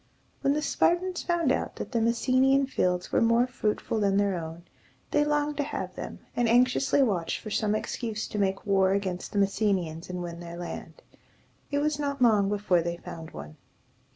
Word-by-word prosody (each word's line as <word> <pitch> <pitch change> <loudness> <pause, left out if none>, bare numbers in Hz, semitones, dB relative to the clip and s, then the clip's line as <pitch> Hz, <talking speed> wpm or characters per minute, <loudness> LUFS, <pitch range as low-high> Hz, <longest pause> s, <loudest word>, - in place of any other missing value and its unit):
When 275 - +3
the 300 +1 -1
Spartans 355 +3 +1
found 340 -6 +1
out - - -1
that - - -6
the 235 -3 +1
Mes 230 +1 +2
se´ni 260 +1 +4
an 275 0 +3
fields 180 -8 -1
were - - +3
more 230 +1 +4
fruitful 220 -3 -2
than 200 -1 +2
their 200 -2 +2
own, 165 0 -6 0.5
they 295 - +3
longed 295 0 0
to 290 - +1
have - - -4
them, - - -7
and 240 -2 +2
anxiously 250 +3 +4
watched 185 -9 0
for 215 - -8
some 215 0 +1
excuse 215 0 -3
to 210 - -3
make 195 -1 0
war 195 -2 +3
against 190 -2 -2
the - - -4
Messenians 195 -5 0
and 180 -1 -4
win 170 -1 -6
their 170 0 -8
land. 175 - -7 0.7
It 285 - -1
was 300 -1 0
not 280 -1 -2
long 215 -5 +4
before 200 -4 +2
they 170 +1 -3
found 165 -1 -9
one. 75 +1 -10
210 Hz, 195 wpm, -28 LUFS, 180-270 Hz, 0.7 s, se´ni